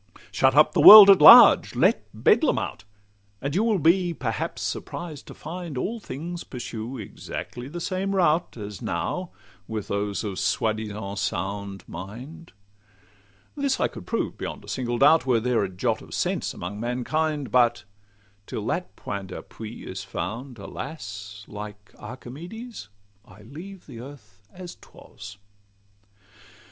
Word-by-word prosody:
Shut 130 +6 +2
up 150 +1 +6
the - - +2
world 210 -2 +12
at 190 -5 +5
large, - - +9
let - - +2
Bedlam - - +2
out; 90 - -5 0.5
And 140 +3 -4
you 195 +6 +2
will 225 -3 +2
be 175 +1 +2
perhaps 115 -8 -4
surprised 160 -5 -6
to - - -11
find 165 -2 -7
All 225 - -3
things 170 0 -7
pursue 120 0 -7
exactly 120 +3 -7
the 170 +5 -7
same 190 +3 -2
route, 170 -5 +1
As 105 -3 -8
now 175 - -3 0.4
with 110 -2 -5
those 100 +1 -2
of 100 -3 -4
soi 110 +2 0
disant 105 -2 -6
sound 100 +1 -4
mind. 125 - -9 1.0
This 280 -2 -1
I - - +2
could - - -11
prove - - -3
beyond - - -6
a - - -18
single 120 -2 -3
doubt, 145 +3 +4
Were 120 -3 +3
there 120 -1 0
a 95 - -3
jot 90 -1 -2
of - - -9
sense - - -1
among 95 +4 -7
mankind; 140 +5 -2
But 120 -1 +3 0.6
till - - -5
that - - -3
point 100 -1 -6
d'appui 110 +4 -9
is 95 0 -6
found, 125 +3 -6
alas! 100 - -8
Like 105 0 -10
Archimedes, 145 - -9 0.3
I 100 +1 -17
leave 170 - -11
earth 115 -6 -13
as 180 -1 -9
'twas. 100 -1 -13
125 Hz, 145 wpm, -25 LUFS, 105-165 Hz, 1.0 s, world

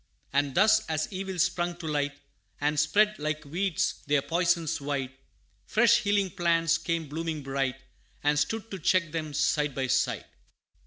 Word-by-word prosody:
And 140 -1 +1
thus, 215 +3 +5
as 155 -1 0
evils 190 -2 -1
sprung 175 0 -1
to 175 - -9
light, 145 -2 -1 0.4
And 150 +1 +1
spread, 210 +7 +3
like 155 0 -3
weeds, 175 +3 -1
their 145 -1 +2
poisons 170 -3 +1
wide, 140 -2 -2 0.6
Fresh 235 +1 +5
healing 205 -4 +1
plants 165 -2 +2
came 165 -2 -2
blooming 160 0 -4
bright, 135 -1 -2 0.4
And 145 0 +3
stood, 220 +9 -2
to 195 - -5
check 170 0 +2
them, 155 -2 -4
side 150 -2 +1
by 135 - -1
side. 125 - 0
160 Hz, 155 wpm, -28 LUFS, 145-185 Hz, 0.6 s, thus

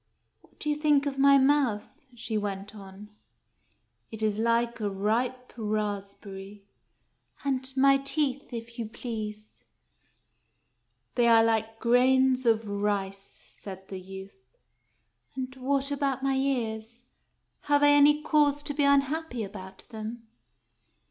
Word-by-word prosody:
" - - -48
What - - -27
do - - -6
you 300 - +2
think 295 -2 +2
of 275 -1 -3
my 280 0 +7
mouth? 265 -6 +2 0.2
" 255 -2 -24
she 225 -1 -5
went 205 -1 -3
on. 200 0 -12 0.5
" - - -44
It 220 -1 -5
is 215 -1 0
like 235 +1 +1
a 210 -2 -1
ripe 235 +6 -2
raspberry." 205 -2 -5 0.8
"And 265 -1 -1
my 275 +1 +6
teeth, 275 0 -2
if 235 0 -8
you 225 - -3
please? 215 -2 -6 0.6
" - - -45
" - - -45
They 240 -1 +3
are 225 -1 +6
like 225 0 0
grains 255 +2 +3
of 225 -1 +2
rice," 200 -1 -1 0.3
said 190 -1 -11
the 190 - -6
youth. 190 -9 -12 0.8
"And 260 0 -5
what 275 +2 -1
about 275 -2 -1
my 275 0 +1
ears? 240 -3 -2 0.6
Have 290 0 +3
I 290 - +7
any 290 +1 +5
cause 290 -2 +2
to 290 - -4
be 290 0 0
un 280 0 +5
happy 280 -4 -4
about 190 -1 -10
them 225 +1 -7
235 Hz, 145 wpm, -28 LUFS, 210-275 Hz, 0.8 s, my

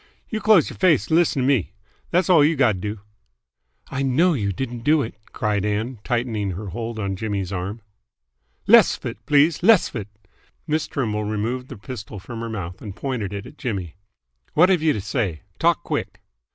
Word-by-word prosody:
"You 220 -1 -3
close 210 -5 +5
y'r - - -11
face 175 -5 +3
'n - - +5
lissen 165 -6 +3
t' - - +1
me. 120 -9 +1 0.4
Thass 180 +2 +2
all 170 -6 +6
you've 155 +1 +3
gotta 115 -8 +3
do." 105 +2 -5 0.9
"I 135 - -2
know 145 +7 +3
you 100 -8 -1
didn't 120 +3 -4
do 150 +2 +4
it!" 115 - -6 0.2
cried 105 -2 -1
Ann, 105 +3 -2
tightening 115 -6 -1
her 100 +3 -6
hold 115 +2 -5
on 100 -3 -2
Jimmy's 100 -2 -3
arm. 100 +4 -4 0.8
"Less - - +6
'f - - -15
it, - - -6
please. 150 +3 +4
Less 210 0 +5
'f - - -14
it!" 105 -4 -4 0.6
Miss 155 0 -1
Trimble 105 -6 -2
removed 115 +5 -2
the - - -9
pistol 105 -1 -8
from 115 +4 -8
her 115 0 -4
mouth 95 -5 -6
and 100 -3 -7
pointed 120 -6 -3
it 100 0 -5
at 145 - -13
Jimmy. 95 - -3 0.6
"What've 180 +1 +5
you 160 -1 +3
to 105 - -3
say? 95 - -2 0.2
Talk - - +2
quick!" - - -4
115 Hz, 190 wpm, -23 LUFS, 105-145 Hz, 0.9 s, all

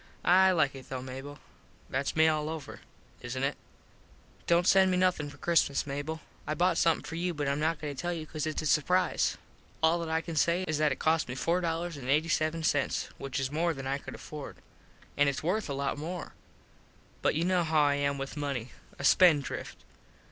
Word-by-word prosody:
I 190 +2 +6
like 155 -6 +2
it 135 -2 -11
though, 130 -1 -4
Mable. 135 +3 -8 0.5
Thats 135 +2 -2
me 160 0 +5
all 155 -1 +1
over. 160 -2 -7 0.4
Isnt 130 +2 -4
it? 140 - -1 0.9
Dont 170 +1 +4
send 190 0 +5
me 180 - +1
nothin 180 -5 +1
for - - -13
Christmas, 165 -5 +2
Mable. 145 +3 -4 0.3
I 155 - -1
bought 175 0 +2
somethin 165 -1 +2
for - - -8
you 175 +1 -2
but 145 -1 -2
Im 140 +1 0
not 160 +1 0
going 145 -2 -5
to 130 - -5
tell 175 - -1
you 165 -2 -4
cause 155 -1 -4
its 155 0 -2
a - - -4
surprize. 180 +5 +2 0.5
All 165 +2 +4
that 165 -1 -4
I 160 0 +1
can 165 -1 -6
say 170 +4 +2
is 155 -1 -1
that 155 -2 +3
it 135 - -2
cost 160 -3 +1
me 125 - -4
four 170 +6 +1
eighty 165 -3 -1
seven 155 +1 0
($4.87) 145 -3 0
which 135 0 -3
is 135 0 -2
more 165 +2 0
than 135 -1 -7
I 135 +1 -1
could - - -9
afford. 150 -2 -8 0.6
An 145 0 +4
its 140 +1 -1
worth 190 +3 0
a - - -1
lot 140 +1 -2
more. 175 +4 -5 0.9
But - - +2
you 165 +2 +1
know 180 -1 +2
how 160 -1 +2
I 145 -1 +3
am 140 0 0
with 135 0 -5
money. 140 -5 -3 0.3
A - - -7
spend 155 -1 +6
drift. - - -7
155 Hz, 215 wpm, -30 LUFS, 140-170 Hz, 0.9 s, I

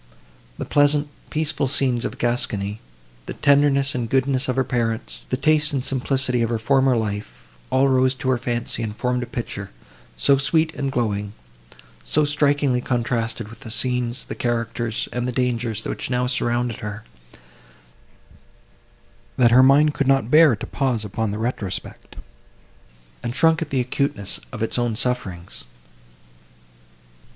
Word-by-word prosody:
The - - -4
pleasant, 145 0 +2 0.2
peaceful 155 -3 -1
scenes 130 -3 +2
of - - -4
Gascony, 105 -4 -1 0.5
the - - -5
tenderness 140 -1 +3
and 120 -2 -3
goodness 135 +1 +1
of 130 - -1
her 130 - +2
parents, 115 -3 -3
the 130 - 0
taste 150 +1 +2
and 135 -3 -1
simplicity 130 -1 0
of 115 - +1
her 115 - 0
former 130 +2 +2
life—all 100 - -2
rose 130 0 +3
to 130 0 -3
her 125 - +1
fancy, 120 -1 -2
and 110 -2 -4
formed 125 +2 -1
a 125 - -4
picture, 100 -4 -5 0.5
so 140 - +4
sweet 160 +3 +1
and 140 -1 -3
glowing, 105 -4 -2 0.7
so 155 0 +2
strikingly 145 -3 +1
contrasted 115 -2 -1
with 115 +1 -13
the 130 -4 -9
scenes, 125 +1 0
the - - -6
characters 115 -1 -2
and 125 0 -2
the - - -1
dangers, 120 -3 -1
which - - -4
now 125 0 0
surrounded 120 -2 -1
her—that 105 +1 -7 2.5
her 125 +2 +7
mind 145 +3 +5
could 140 - -1
not 135 -3 +2
bear 155 -5 +7
to 110 - -7
pause 125 -6 -1
upon 110 +2 -2
the 105 - -3
retrospect, 110 -4 -4 1.1
and 120 +1 -4
shrunk 165 +2 +3
at 160 - -3
the 135 - 0
acuteness 125 -5 -2
of 115 -2 -4
its 115 - 0
own 120 -2 0
sufferings. 105 -8 -2
125 Hz, 145 wpm, -22 LUFS, 115-135 Hz, 2.5 s, her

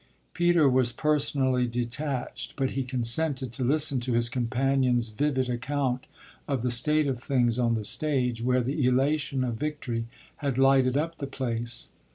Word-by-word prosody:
Peter 175 -3 +3
was 130 -2 +3
personally 135 -4 +1
detached, 125 +3 -3
but 135 -1 -1
he 135 - -2
consented 130 +1 -1
to 130 +2 -3
listen 140 +1 +2
to 120 0 -2
his 115 0 +3
companion's 125 0 +1
vivid 130 +3 0
account 125 +1 -2 0.4
of 135 -5 -1
the 125 - +1
state 150 +6 +2
of 130 -4 -2
things 125 -3 +1
on 120 -1 +2
the 110 -2 -3
stage, 125 -4 -1
where 125 +1 +2
the 135 +4 -1
elation 135 +1 +1
of 120 -3 -2
victory 125 -5 -3 0.3
had 140 -3 -2
lighted 135 -1 +4
up 165 +2 -2
the 140 - -4
place. 120 -3 -3
130 Hz, 160 wpm, -27 LUFS, 120-140 Hz, 0.4 s, lighted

